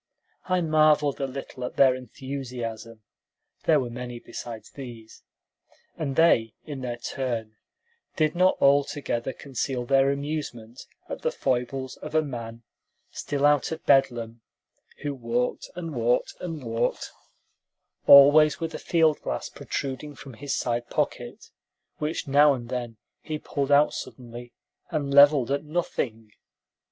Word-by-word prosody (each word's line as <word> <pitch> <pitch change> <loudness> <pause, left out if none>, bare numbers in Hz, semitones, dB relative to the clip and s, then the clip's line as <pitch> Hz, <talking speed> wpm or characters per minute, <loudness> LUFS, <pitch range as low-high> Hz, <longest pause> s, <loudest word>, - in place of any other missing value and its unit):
I 185 -1 +1
marveled 155 -3 +3
a 135 - 0
little 130 -1 -7
at 125 - -5
their 135 -2 +6
enthusiasm 120 -3 -7 0.6
(there - - +5
were 120 -2 -4
many 120 0 -6
beside 115 -1 -8
these), 120 -5 -10 0.7
and 140 -4 -3
they, 115 -10 +4
in 140 -3 -6
their 120 -2 -4
turn, 120 -3 -4 0.6
did 155 -1 +2
not 185 +1 +3
altogether 140 -3 +1
conceal 130 -2 -4
their 135 +1 +4
amusement 140 -5 -5 0.2
at - - -6
the - - +1
foibles 130 +1 -2
of 150 +1 -8
a 155 - +4
man, 115 -4 -7 0.5
still 145 0 -2
out 145 0 +3
of 160 - -6
Bedlam, 120 -4 +2 0.6
who 145 -1 -2
walked 120 -1 -2
and 165 -3 -5
walked 120 -1 +1
and 165 -5 -5
walked, 115 -1 -2 1.0
always 145 +2 +8
with 165 -1 -4
a - - -5
field 160 -3 +2
glass - - -4
protruding 140 +2 -5
from 135 0 -11
his 135 +5 -3
side 120 -1 -2
pocket, - - -3 0.5
which 155 +1 -3
now 145 +1 +5
and 120 -2 -8
then 120 -3 -4 0.2
he 155 -1 -4
pulled 140 -2 -3
out 145 +1 +5
suddenly 120 -1 -8 0.4
and 140 -2 -2
leveled 140 -2 +6
at 140 +1 0
nothing. 125 -9 -3
135 Hz, 135 wpm, -26 LUFS, 120-145 Hz, 1.0 s, always